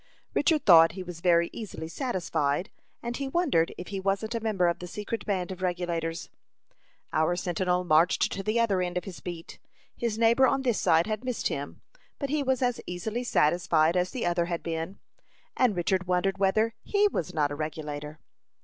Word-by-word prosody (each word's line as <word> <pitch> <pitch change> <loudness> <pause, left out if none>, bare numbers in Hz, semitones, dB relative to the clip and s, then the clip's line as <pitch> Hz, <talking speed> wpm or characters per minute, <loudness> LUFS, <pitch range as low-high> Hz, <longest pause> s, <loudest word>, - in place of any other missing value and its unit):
Richard 305 -1 +2
thought 165 -3 +8
he 185 0 -6
was 175 -2 -9
very 170 -1 +3
easily 195 -8 -6
satisfied, 175 - -1 0.3
and 240 0 -3
he 275 +1 -3
wondered 270 - +1
if 180 - -7
he 195 -1 -3
wasn't 195 +4 -1
a 230 - -1
member 210 -5 +1
of 170 - 0
the 180 - -7
secret 210 +5 -5
band 190 -3 -1
of 185 0 -7
Regulators. 175 -2 -2 0.8
Our 160 +3 +2
sentinel 180 0 0
marched 170 +1 +3
to 195 - -3
the 215 +3 0
other 200 -5 +2
end 180 0 -2
of 180 - -2
his 185 -2 -8
beat. 170 -2 -8 0.4
His 230 -2 -2
neighbor 235 +3 +5
on 270 +2 +1
this 245 -4 +1
side 165 +1 +4
had 215 +2 -3
missed 250 -2 -1
him, 140 +1 -5 0.4
but 280 -2 -3
he 300 -1 +1
was 265 -2 0
as 245 -1 0
easily 215 +7 -3
satisfied 165 -5 +2
as 180 0 +1
the 250 - -3
other 175 0 +1
had 170 -1 -3
been, 165 +3 -4 0.6
and 245 -6 +3
Richard 180 +1 0
wondered 190 +2 +1
whether 215 +4 +2
he 415 0 +2
was 175 - -3
not 145 -2 0
a - - -3
Regulator. 150 0 -5
180 Hz, 190 wpm, -28 LUFS, 170-225 Hz, 0.8 s, thought